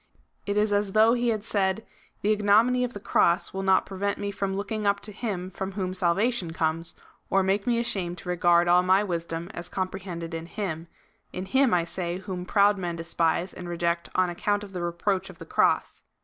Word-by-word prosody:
It 200 +1 0
is 210 0 +2
as 205 -1 0
though 220 +2 +6
he 245 0 0
had 215 -2 -1
said: 200 -1 0 0.2
" - - -35
The 210 - +3
ignominy 215 +4 +4
of 250 0 -3
the 205 - -6
cross 175 -4 +2
will 195 - -3
not 190 -1 +3
prevent 200 +1 -2
me 200 0 -3
from 195 -1 -2
looking 205 +1 -2
up 200 0 +2
to 210 - -5
him^ 195 -4 -4
from 190 0 -4
whom 185 -2 -2
salvation 185 +1 +1
comes, 165 0 -1 0.3
or 195 0 +3
make 195 +3 0
me 240 -1 +2
ashamed 190 -7 -1
to 180 - -8
regard 175 -1 +3
all 175 +1 +6
my 185 +2 +4
wisdom 170 -1 -4
as 175 +1 -7
comprehended 185 -3 -4
in 165 0 -5
him 170 -5 -4 0.2
— - - -41
in 185 - -4
him, 265 +5 +3
I 175 -2 +3
say, 170 +1 -4
whom 185 -1 -6
proud 205 -1 +4
men 175 -2 -3
despise 165 +1 0
and 175 -1 -8
reject 170 0 -1
on 185 -1 +2
account 205 +4 -1
of 200 -1 -10
the 180 - -4
reproach 185 +3 -1
of 180 - -12
the - - -10
cross." - - +1
190 Hz, 215 wpm, -26 LUFS, 175-205 Hz, 0.3 s, though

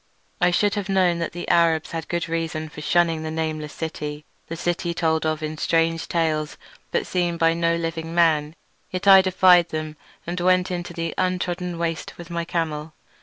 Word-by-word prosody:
I 180 - +5
should 205 +3 +2
have 205 -2 -3
known 185 -3 +2
that 170 - -2
the 175 - -7
Arabs 165 -2 +3
had 165 -1 -4
good 170 -1 -2
reason 160 -1 -3
for 155 - -10
shunning 165 0 +2
the 160 - -4
nameless 155 -1 -3
city, 150 -2 -5 0.2
the 165 - -5
city 175 0 -2
told 160 -1 +1
of 155 0 -2
in 155 0 -4
strange 165 0 +1
tales 155 -3 -1 0.3
but - - 0
seen 175 -2 -1
by 165 0 +3
no 170 0 +1
living 165 0 -4
man, 155 -2 +3 0.3
yet 185 +1 -4
I 195 -1 +10
defied 185 -2 +5
them 155 -1 -5 0.3
and 175 +1 -3
went 185 +1 +2
into 175 -1 -4
the 165 -1 -3
untrodden 180 -1 -1
waste 165 -1 -3
with 175 0 -10
my 170 0 -2
camel. 160 -2 -3
165 Hz, 185 wpm, -23 LUFS, 160-175 Hz, 0.3 s, I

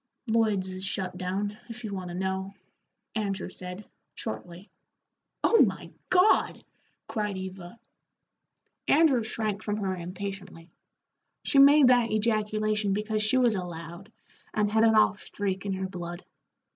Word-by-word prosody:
"Lloyd's 215 -5 +1
has 185 0 -7
shut 190 -1 -3
down, 195 +4 -3
if 240 +1 -9
you 210 -2 -4
want 185 -2 -5
to 175 - -6
know," 190 +1 -3 0.6
Andrew 200 -4 -2
said, 185 +2 -8 0.3
shortly. 170 - -7 0.7
"Oh 460 - +5
my - - +1 0.2
God!" 365 +3 +3 0.4
cried 210 -3 -2
Eva. 190 +2 -8 1.1
Andrew 280 -6 +4
shrank 215 -2 -2
from 210 -1 -2
her 195 -3 -2
impatiently. 185 -1 -7 0.7
She 280 - +3
made 280 -1 +8
that 245 -2 +4
ejaculation 215 -1 0
because 215 +1 -1
she 215 +4 +2
was 245 -3 +4
a 190 -3 -2
Loud, 170 +4 -9 0.4
and 210 -1 +1
had 220 +1 +3
an 225 -1 +5
off 215 -1 +4
streak 195 -1 -3
in 195 - -1
her 190 0 -3
blood. 175 -1 -7
205 Hz, 140 wpm, -28 LUFS, 185-220 Hz, 1.1 s, made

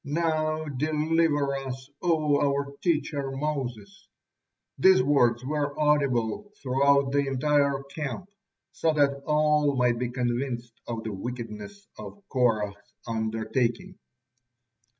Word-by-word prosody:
Now 155 0 0
deliver 150 0 +1
us, 135 0 -6
O 155 -4 +2
our 140 0 0
teacher 150 -5 0
Moses!" 140 - -4 0.7
These 190 -8 +6
words 125 -4 +3
were 145 0 -2
audible 145 - +1
throughout 140 +1 +3
the 140 0 +1
entire 140 0 +1
camp, 140 +4 -5 0.5
so 160 - +1
that 140 -2 +2
all 150 -1 +3
might 125 -2 +2
be 125 -1 -1
convinced 120 -1 -2
of 115 -1 -4
the 110 - -4
wickedness 120 - -7
of 205 -1 -10
Korah's 105 -6 0
undertaking. 115 +8 -2
140 Hz, 110 wpm, -27 LUFS, 125-150 Hz, 0.7 s, These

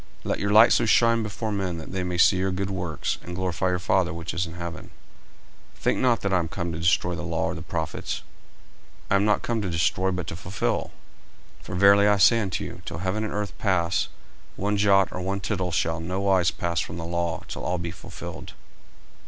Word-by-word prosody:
40:005:016 - - -4
Let - - -1
your 100 0 0
light 110 +3 +8
so 120 - +3
shine 115 +1 +4
before 110 +1 -3
men, 95 -4 -2
that 80 - -8
they 95 0 -2
may 90 -1 -2
see 95 +2 +5
your 95 +1 0
good 95 +1 -2
works, 90 -5 -3
and 90 - -7
glorify 95 0 -1
your 90 - +1
Father 95 0 +1
which 85 +1 -5
is 90 +1 -1
in 85 - -9
heaven. 85 0 -6 0.9
40:005:017 - - -23
Think - - +2
not 120 -5 +2
that 100 -1 -1
I 90 - +4
am 85 - -1
come 85 0 -4
to 80 - -5
destroy 90 +1 +2
the - - -4
law, 80 -1 -1
or 80 - -1
the 85 - -7
prophets: 80 -1 -4 0.9
I - - +5
am 100 - +2
not 105 0 +2
come 115 -2 -1
to 95 - -2
destroy, 85 +3 +1
but 90 -2 -2
to 80 - -5
fulfil. 95 +2 -2 0.7
40:005:018 - - -19
For 95 - -5
verily 100 +2 +6
I 105 0 +4
say 115 +4 +6
unto 95 -5 -2
you, - - -8
Till - - -6
heaven 95 +5 -2
and 110 - -3
earth 105 -1 -3
pass, 90 -2 +1 0.5
one 105 +2 -1
jot 100 -1 +4
or 90 - -5
one 95 +2 -2
tittle 95 -2 -2
shall 80 -1 0
in 85 0 -6
no 95 +1 -2
wise 95 -2 +3
pass 85 -1 -2
from - - -4
the 85 - -5
law, 85 0 -2
till - - -6
all 90 - -1
be 85 -1 -4
fulfilled. - - -9
95 Hz, 235 wpm, -25 LUFS, 85-100 Hz, 0.9 s, light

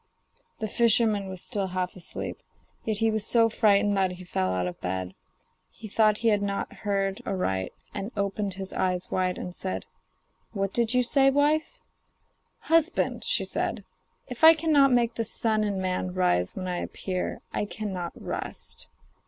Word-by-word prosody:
The 220 - -3
fisherman 215 -2 +3
was 185 -1 -5
still 200 -5 -1
half 185 0 -3
asleep, 185 - -6 0.4
yet 215 -2 -1
he 225 +1 +2
was 215 -1 -1
so 230 0 +4
frightened 205 -2 +3
that 190 -1 +2
he 180 0 -10
fell 95 - -1
out 90 -1 0
of 90 - -6
bed. 95 0 -3 0.6
He 220 - -11
thought 215 0 +3
he - - +6
had 205 -2 +2
not 200 0 -2
heard 195 -2 -1
aright, 95 - -1 0.2
and 200 +4 -4
opened 200 -1 -1
his 190 0 -6
eyes 180 -1 -1
wide 185 -1 0
and 180 - -6
said: 185 +1 -4 0.7
'What 195 -2 -2
did 235 0 +1
you 250 - +4
say, 270 +2 +4
wife?' 295 +3 +1 0.8
'Husband,' 330 +1 +1
she - - +1
said, - - -2 0.4
'if 250 +3 -8
I 325 +1 +10
cannot 300 -4 +4
make 240 -1 +3
the 230 - -2
sun 220 -1 +2
and 200 -2 -1
man 185 -1 -2
rise 90 - +1
when 185 -1 -4
I 180 -1 -2
appear 185 -1 -4
I - - 0
cannot 190 -5 -5
rest. - - -6
200 Hz, 170 wpm, -27 LUFS, 185-225 Hz, 0.8 s, I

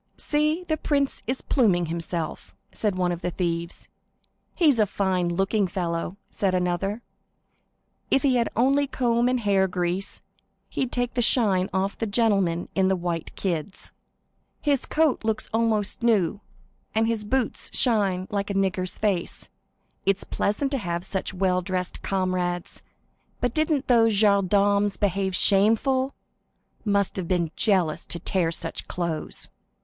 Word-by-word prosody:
"See, 305 +3 0
the 315 -3 -1
prince 280 -2 0
is 255 +2 -2
pluming 195 -10 +2
himself," 165 - -4 0.2
said 210 -4 -1
one 180 -1 +1
of 175 0 -4
the 180 - -1
thieves. 170 -1 -3 0.7
"He's 300 -9 +4
a 210 - +4
fine 185 -3 0
looking 195 +3 +1
fellow," 175 0 -3
said 190 -2 0
another; 185 +5 -1 1.1
"if 270 - +3
he 270 -3 +3
had 235 - +1
only 275 +4 +3
a - - -11
comb 240 -2 +1
and 255 -1 0
hair 195 -2 +3
grease, 180 +1 -3 0.5
he'd 260 -2 -2
take 245 -1 -1
the 245 - +1
shine 200 -6 +3
off 190 +1 -1
the 225 - -1
gentlemen 200 -6 +1
in 190 -1 +2
white 170 -2 -3
kids." 180 0 -4 0.7
"His 285 -3 +1
coat 310 -6 +2
looks 220 -1 -1
nearly 225 -2 +2 0.2
new, 210 -4 +2 0.5
and 220 +1 +3
his 225 -2 -1
boots 255 +3 -1 0.2
are 240 -3 +3
brilliant. 185 -2 -1
It 195 -1 -2
is - - -9
pleasant 270 +7 -1
to 275 - +1
have 175 -3 -3
such 190 - -3
well 185 -1 +1
dressed 185 0 -3
brethren; 185 -2 -1 0.8
and 300 +3 +1
those 225 -3 +4
gendarmes 200 0 +3
behaved 195 -2 0
shamefully. 225 +8 +3 0.8
What 185 -4 0
jealousy; 180 -7 +1
to - - 0
tear 170 -1 0
such - - -4
clothes!" 170 -3 -4
200 Hz, 135 wpm, -25 LUFS, 180-230 Hz, 1.1 s, He's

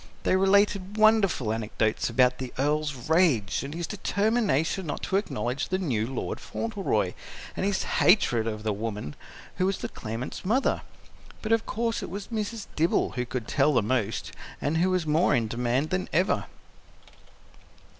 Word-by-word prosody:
They - - +3
related 200 +1 +3
wonderful 210 - +4
anecdotes 110 0 -1
about 125 +1 +3
the 130 -2 -5
Earl's 145 -2 -1
rage 155 - +3
and 140 +3 -6
his 170 0 -2
determination 200 - 0
not 145 - -4
to 190 - -1
acknowledge 135 -7 -2
the 185 - +1
new 120 - -1
Lord 130 0 -4
Fauntleroy, 220 -4 -1 0.4
and 190 - 0
his 200 -1 0
hatred 120 - +3
of 110 -1 -4
the 110 -1 0
woman 105 -7 -4 0.4
who 185 - +2
was 195 - 0
the - - -5
claimant's 115 +4 -6
mother. 245 +8 +1 0.6
But, 215 - -2
of 225 0 +2
course, 230 0 -1
it - - -5
was 195 +3 -6
Mrs. 220 -1 -3
Dibble 165 +2 +2
who 125 -1 -3
could 125 -2 -4
tell 145 +2 +3
the 120 - +4
most, 110 -1 -1 0.3
and 150 +3 0
who 180 +3 +3
was 185 -3 +1
more 155 +4 +3
in 115 -2 +1
demand 125 +5 -1
than 185 0 -1
ever. 185 +4 +2
155 Hz, 165 wpm, -27 LUFS, 120-195 Hz, 0.6 s, wonderful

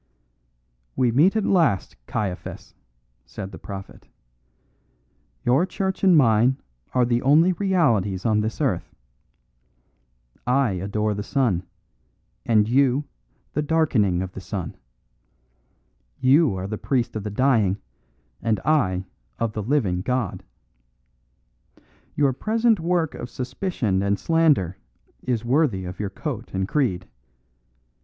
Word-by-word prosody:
"We 125 -2 +2
meet 160 - +4
at 220 - +1
last, 160 - +2
Caiaphas," 100 -4 -4 0.5
said 95 - -8
the - - -10
prophet. 95 -1 -9 1.4
"Your 130 +7 +4
church 190 0 -3
and 185 -4 +6
mine 120 0 +4 0.4
are 125 -1 +4
the 120 0 +1
only 160 +7 +5
realities 120 - +1
on 110 -2 +3
this 110 +1 -3
earth. - - -1 1.5
I 130 -2 +3
adore 100 +3 -1
the 100 - -4
sun, 105 -6 0 0.8
and 110 -2 +4
you 135 +3 +3 0.5
the 150 - 0
darkening 130 - +2
of 95 - -6
the 95 - -8
sun; 95 -3 -5 1.4
you 135 - +4
are 95 - -4
the 105 +2 -4
priest 125 -5 -1
of 110 - -3
the 105 - -3
dying 105 -4 +2 0.6
and 110 -3 0
I 100 -12 +2 0.3
of 115 -2 -1
the 105 - -3
living 105 -7 0
God. 125 -1 -2 1.7
Your 140 -2 +2
present 225 - +1
work 170 -1 0
of 120 - -7
suspicion 125 - -2
and 100 +1 +1
slander 150 - +2 0.4
is 120 -2 -2
worthy 120 - +1
of 90 +1 -7
your 105 -2 -2
coat 115 - -6
and 95 0 -1
creed. 100 -10 0
120 Hz, 120 wpm, -23 LUFS, 100-150 Hz, 1.7 s, and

